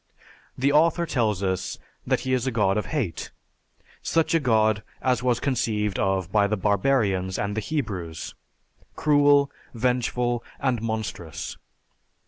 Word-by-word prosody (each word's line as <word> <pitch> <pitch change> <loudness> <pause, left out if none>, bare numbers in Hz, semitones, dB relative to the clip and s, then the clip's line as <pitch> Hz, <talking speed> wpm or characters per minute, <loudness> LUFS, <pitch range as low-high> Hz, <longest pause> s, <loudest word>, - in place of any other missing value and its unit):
The 135 +2 +2
author 165 +3 +3
tells 110 - 0
us 95 -1 -2 0.3
that - - +1
He 130 - -1
is 130 0 0
a - - +1
god 100 -4 +2
of 105 - -1
hate, 120 - -3 0.7
such 165 0 +1
a 165 - +4
god 110 -5 +2 0.2
as 125 -2 +1
was 125 -2 +1
conceived 110 -7 -1
of 95 -2 0
by 105 -1 +3
the 110 +1 -1
barbarians 100 -2 +1
and 100 0 -2
the 110 - -1
Hebrews 100 - -4 0.6
cruel, 145 -1 +4 0.2
vengeful, 120 0 0 0.2
and 125 -4 0
monstrous. 110 -8 -4
115 Hz, 135 wpm, -25 LUFS, 100-130 Hz, 0.7 s, a